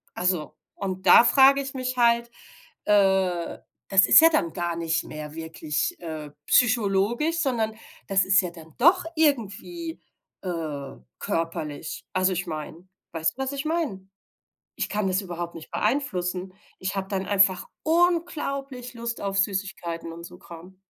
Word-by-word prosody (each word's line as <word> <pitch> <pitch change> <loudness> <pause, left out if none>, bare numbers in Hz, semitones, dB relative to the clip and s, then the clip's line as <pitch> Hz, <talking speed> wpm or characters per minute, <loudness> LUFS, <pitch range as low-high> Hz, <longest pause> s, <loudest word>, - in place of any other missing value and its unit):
Also 180 -4 -1 0.2
und 190 -2 -5
da - - +9
frage 275 +2 +6
ich 270 0 -6
mich 255 -1 -3
halt, 235 0 +3 0.6
äh, 190 -4 +2 0.3
das 190 -1 +6
ist - - +8
ja 325 - +8
dann 170 - 0
gar 175 -1 -2
nicht 165 0 -1
mehr 150 0 -8
wirklich, 160 -2 -3
äh, 155 -3 -6 0.2
psychologisch, 235 +6 +2
sondern 230 -7 0 0.3
das 195 -2 +3
ist 195 +3 +5
ja 180 - -4
dann 165 -2 -14
doch 345 +6 +5
irgendwie, 310 - -1 0.4
äh, 155 -7 -5 0.2
körperlich. 165 -2 -4
Also, 185 0 +2
ich 180 +1 -3
meine 160 +3 -7 0.3
weißt 160 +8 -1
du, - - -4
was 265 - -3
ich 280 +1 -4
meine? 295 - -2 0.7
Ich - - -2
kann 205 -2 -1
das 185 +2 +1
überhaupt 175 -2 -6
nicht 160 - -11
beeinflussen. 190 -7 -1 0.3
Ich 190 +1 -3
habe 195 0 -3
dann 195 -1 -2
einfach 195 -2 +3 0.2
unglaublich 305 -7 0
Lust 235 0 -4
auf 195 -1 -2
Süßigkeiten 190 -4 -2
und 170 0 -10
so 180 +1 -11
Kram. 175 +3 -13
195 Hz, 150 wpm, -25 LUFS, 170-250 Hz, 0.7 s, da